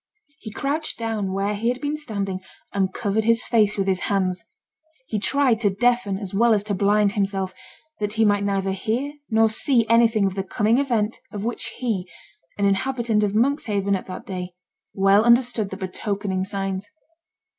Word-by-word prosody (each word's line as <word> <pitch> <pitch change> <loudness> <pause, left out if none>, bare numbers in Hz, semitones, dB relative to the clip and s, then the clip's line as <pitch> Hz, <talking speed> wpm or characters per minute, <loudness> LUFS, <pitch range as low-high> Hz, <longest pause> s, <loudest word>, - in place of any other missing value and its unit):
He 220 - -8
crouched 290 +7 -3
down 220 -4 -2
where 195 +2 -1
he 220 +3 0
had 250 +1 -1
been 290 +2 -2
standing 200 -10 -3 0.3
and 190 -2 +1
covered 215 +1 -1
his 230 +2 +2
face 215 -3 +2
with 195 - +1
his 190 -1 +1
hands. 185 -3 0 0.6
He 215 -4 -2
tried 260 0 +2
to 210 -4 +2
deafen 225 0 +1
as 195 -2 -6
well 230 +2 +4
as 205 - 0
to 210 -1 -2
blind 205 +1 +3
himself, 195 -2 -1 0.5
that 210 0 -2
he 220 0 +3
might 205 -1 +2
neither 195 -1 0
hear 230 +9 -2 0.2
nor 225 -1 +4
see 230 +1 +2
anything 230 -2 +4
of 195 - 0
the 195 - -2
coming 215 +5 +1
event 230 -6 0
of 205 -2 -5
which 235 +1 -2
he, 205 -8 -2 0.5
an 200 - +1
inhabitant 225 +2 +1
of 205 -1 0
Monkshaven 215 -5 +1
at 185 - -5
that 185 - -7
day, 180 -2 -6 0.4
well 195 +2 +4
understood 235 -3 +3
the 190 - -6
betokening 195 0 -3
signs. 195 0 -3
210 Hz, 175 wpm, -23 LUFS, 195-230 Hz, 0.6 s, well